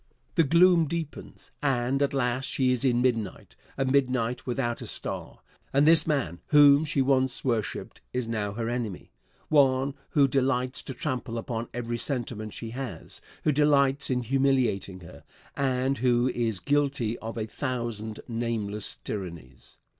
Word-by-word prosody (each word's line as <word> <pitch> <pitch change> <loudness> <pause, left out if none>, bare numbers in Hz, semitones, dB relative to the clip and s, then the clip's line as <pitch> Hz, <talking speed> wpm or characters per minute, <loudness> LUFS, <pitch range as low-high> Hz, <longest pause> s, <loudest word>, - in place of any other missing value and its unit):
The 165 - +4
gloom 170 +2 +5
deepens, 160 -1 -6
and 135 -1 0
at 140 - +2
last 130 -1 0
she 130 -1 +1
is 125 0 0
in 125 -2 +2
midnight 115 - -2 0.2
a 135 - +1
midnight 130 -3 0
without 120 -1 -2
a - - -6
star. - - -5 0.3
And 140 +2 +3
this 160 -1 +7
man, 110 - -1
whom 145 0 +6
she 140 -3 +1
once 130 -1 +1
worshiped, 115 -5 -2
is 125 -2 -2
now 105 -3 -2
her 115 +1 -3
enemy 115 -6 -4 0.4
one 135 -2 +3 0.2
who 140 -2 +4
delights 130 -1 0
to 135 - -8
trample 125 -5 -3
upon 115 0 -4
every 120 0 -4
sentiment 120 -6 -3
she 115 -1 -6
has 120 -9 -7 0.2
who 150 - +3
delights 140 -1 +3
in 125 -1 0
humiliating 125 -7 +1
her, 85 - -13 0.3
and 135 -1 0
who 125 0 +2
is 115 -5 -1
guilty 140 -3 0
of 115 +1 -6
a 110 - -2
thousand 115 -3 -4
nameless 115 -3 -2
tyrannies. 85 - -8
125 Hz, 150 wpm, -27 LUFS, 115-140 Hz, 0.4 s, this